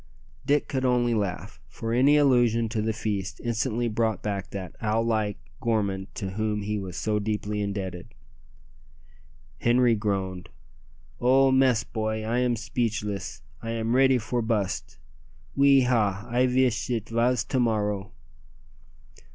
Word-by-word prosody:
Dick 145 0 +2
could 130 -1 -2
only 125 -2 +2
laugh, 90 - -3
for 115 +10 -5
any 140 +5 +5
allusion 120 -5 +3
to 110 -1 -1
the 110 +1 0
feast 105 -3 -3
instantly 120 0 -1
brought 110 -2 -1
back 100 -2 -3
that 95 -2 -7
owl 110 0 +1
like 110 -3 0 0.2
gourmand 100 -4 -1
to 95 -3 -4
whom 105 +1 -2
he 105 +1 -2
was 95 -2 -6
so 105 -1 0
deeply 105 0 -2
indebted. 95 -6 -5 1.5
Henri 120 0 +4
groaned. 95 -4 -2 0.7
"Oh! 135 +2 +4
mes 130 -3 +3
boy, 110 -1 -3
I 115 +3 0
am 125 -1 +2
speechless! 105 - -3 0.2
I 115 0 -4
am 115 +1 -1
ready 130 0 +5
for 120 +1 -2
bust! 110 -9 -2 0.6
Oui 140 -1 +6
hah! 110 -5 +1
I 125 +2 +2
veesh 125 -2 +1
it 115 -3 -2
vas 120 +1 +2
to 130 - -1
morrow." 105 -4 0
110 Hz, 140 wpm, -26 LUFS, 105-120 Hz, 1.5 s, Oui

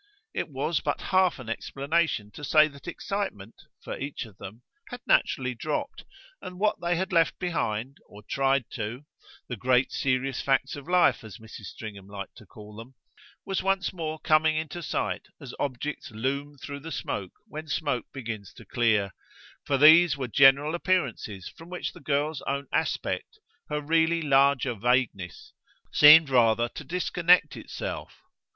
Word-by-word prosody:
It - - -3
was 145 +4 -1
but 145 - -2
half 185 -2 +2
an 130 -4 -10
explanation 140 -1 -1
to 145 - -11
say 155 +2 +5
that 140 +2 -14
excitement, 175 - -4 0.3
for - - -5
each 140 -2 -5
of 105 -4 -16
them, 110 +6 -10 0.3
had 245 -1 -8
naturally 125 -1 +2
dropped, 145 +6 -4 0.4
and - - -7
that - - -12
what 210 -2 +1
they 175 0 +1
had 190 +2 -2
left 165 -2 +3
behind, 140 - -2
or 105 +1 -14
tried 135 +3 +1
to 115 +6 -5 0.4
the 125 - -4
great 125 +3 +2
serious 130 0 -1
facts 135 -1 +1
of 140 0 -10
life, 180 -7 +3
as 110 -4 -10
Mrs. 110 -2 -11
Stringham 100 -1 -9
liked 100 -1 -8
to - - -15
call 105 -1 -13
them 115 +4 -11 0.5
was 195 -1 -1
once 195 0 0
more 160 -3 -4
coming 155 0 +3
into 160 +2 -4
sight 160 - -3
as - - -9
objects 140 +2 -4
loom 140 +6 -3
through 140 +1 -8
smoke 100 - -4
when 155 +1 -8
smoke 145 -5 -2
begins 110 -6 -7
to - - -13
clear; 110 -6 +1 0.5
for 140 - +1
these 155 +1 +7
were 130 -2 -3
general 140 +4 +5
appearances 135 - -1
from 165 +1 -13
which 180 - -4
the - - -13
girl's 145 0 -1
own 140 +1 -1
aspect, - - -2 0.3
her 150 - -1
really 165 +2 +2
larger 135 -2 +3
vagueness, 115 -5 -1 0.4
seemed 150 +1 +9
rather 120 -2 +4
to - - -9
disconnect 175 -2 +2
itself. - - -7
140 Hz, 160 wpm, -27 LUFS, 120-160 Hz, 0.5 s, seemed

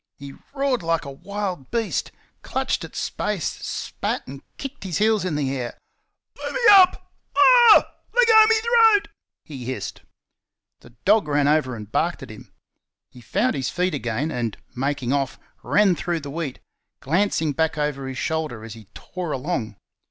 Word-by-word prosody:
He 140 0 -10 0.2
roared 275 -3 0
like 165 -2 -1
a 140 - -6
wild 185 -1 -5
beast, 220 - -2 0.3
clutched - - -2
at - - -10
space, - - -3 0.2
spat, - - -4
and 135 +1 -10 0.2
kicked 275 -3 -7
his 185 -4 -3
heels 215 -1 +2
in 180 -5 -2
the 140 -2 -1
air. 120 -2 -5 0.6
"Let - - -5
me - - -2
up! 380 -2 +5 0.3
AH 475 +3 +8
H - - 0
H! - - -20 0.3
let - - +5
go 440 -1 +8
me 450 - +5
throat!" 455 -3 +4 0.4
he 135 -5 -8
hissed. 130 +1 -5 0.8
The 120 - -18
dog 205 -3 +4
ran 145 -1 +2
over 150 -4 +1
and 105 -1 -10
barked - - -1
at - - -9
him. - - -13 0.6
He 125 - -14
found 205 - 0
his 130 -2 -2
feet 180 0 -1
again, 130 +2 -2
and, 120 -5 -3 0.2
making 135 -1 -1
off, 135 -2 -1 0.2
ran 200 -3 +3
through 170 -1 -3
the 140 -1 -7
wheat, 155 -3 -4 0.4
glancing 160 0 0
back 160 +2 -1
over 145 -2 -2
his 130 0 -6
shoulder 155 -9 -3
as 115 -2 -8
he 110 -1 -13
tore 180 -3 -6
along. 130 - -3
155 Hz, 175 wpm, -23 LUFS, 135-205 Hz, 0.8 s, AH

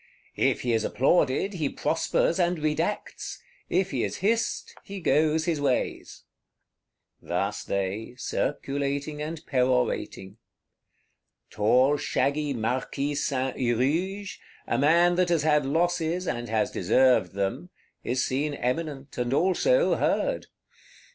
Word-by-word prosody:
If - - +1
he 120 -2 0
is 110 -1 +1
applauded, 135 - +2
he 155 -6 -1
prospers 165 +2 0
and 175 0 +2
redacts; 155 +6 -2 0.3
if 195 0 +1
he - - -1
is - - -2
hissed, 225 +4 -1
he 200 0 -7
goes 155 0 +2
his 160 -4 -1
ways." 130 -3 -2 1.0
Thus 100 +4 -2
they, 100 +5 -3
circulating 140 +2 -2
and 160 +1 -5
perorating. 125 -6 0 1.1
Tall 130 +7 +3
shaggy 145 +1 0
Marquis 130 +4 -2
Saint 135 -2 -1
Huruge, 160 - -1 0.3
a - - 0
man 170 +5 +4
that 180 -1 +2
has 165 -4 +2
had 150 -3 +3
losses, 170 +3 0
and 120 0 -3
has 115 +3 0
deserved 125 -9 +3
them, 100 - -2 0.3
is 130 +2 0
seen 145 +3 -1
eminent, 140 +1 -3
and 125 +2 0
also 485 - +3
heard. - - 0
145 Hz, 120 wpm, -26 LUFS, 125-170 Hz, 1.1 s, man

